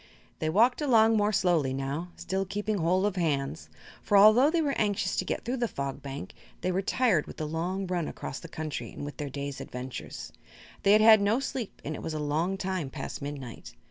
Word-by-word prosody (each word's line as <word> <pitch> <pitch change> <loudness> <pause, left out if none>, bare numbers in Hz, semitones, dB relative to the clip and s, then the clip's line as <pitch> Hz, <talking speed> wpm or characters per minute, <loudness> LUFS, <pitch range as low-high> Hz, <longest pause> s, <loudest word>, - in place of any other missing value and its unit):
They 155 - 0
walked 235 - +3
along 225 -5 +5
more 210 0 +2
slowly 170 -10 +2
now, 140 +5 -3
still 190 +2 -2
keeping 205 +2 -2
hold 180 +4 +2
of 205 -2 -1
hands; 135 - -1 0.3
for 205 - +3
although 215 +8 +7
they 335 +1 +1
were 290 -3 +1
anxious 205 -3 0
to 185 - 0
get - - -3
through 250 +3 -1
the 240 -1 0
Fog 140 -7 -4
Bank 140 0 -7 0.3
they 185 - 0
were 185 +2 0
tired 200 -6 +2
with - - -10
the 155 - -3
long 175 +5 -2
run 180 -3 -1
across - - -6
the - - -9
country 155 -1 -5
and - - -7
with 145 - -7
their 145 -2 -4
day's 140 0 -5
adventures. 125 - -7 0.5
They 200 - +5
had 215 - +6
had 220 -1 +8
no 210 +5 +2
sleep 265 -5 -5
and 155 - -3
it - - -6
was 160 - -4
a - - -2
long 160 +6 0
time 185 -6 -2
past - - -6
midnight. 140 -4 -7
180 Hz, 215 wpm, -28 LUFS, 145-210 Hz, 0.5 s, had